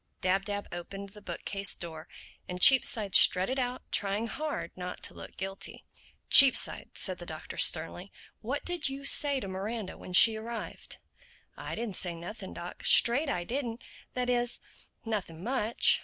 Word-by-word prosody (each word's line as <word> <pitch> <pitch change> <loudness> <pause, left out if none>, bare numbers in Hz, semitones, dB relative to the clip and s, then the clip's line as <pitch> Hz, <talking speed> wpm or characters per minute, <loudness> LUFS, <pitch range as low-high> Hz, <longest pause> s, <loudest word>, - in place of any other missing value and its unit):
Dab 195 +1 -1
Dab 205 -1 -4
opened 195 +3 -8
the 210 +1 -16
bookcase 195 +2 -3
door 160 -1 -9 0.4
and 180 0 -6
Cheapside 220 -3 +5
strutted 190 +9 +5
out 250 0 -4
trying 205 +2 0
hard 300 +6 -5
not 180 0 -8
to - - -4
look - - -12
guilty. 195 0 -6 0.4
"Cheapside," 275 -2 +7
said - - 0
the - - -9
Doctor - - -9
sternly, - - -1 0.3
"what - - -5
did 355 -5 -1
you 275 +1 -8
say 280 -1 +3
to 200 - -7
Miranda 195 +2 -6
when 180 - -11
she 220 +4 +6
arrived?" 225 0 -8 0.6
"I - - -7
didn't 220 -4 -3
say 175 -2 -3
nothing, 185 +4 -9
Doc, 175 +1 -9
straight 275 +6 +4
I 175 -9 -3
didn't. 240 +2 -5 0.3
That 250 -1 -2
is, 245 -1 -2 0.5
nothing 185 -7 -5
much. 235 -2 +1
210 Hz, 155 wpm, -28 LUFS, 185-245 Hz, 0.6 s, Cheapside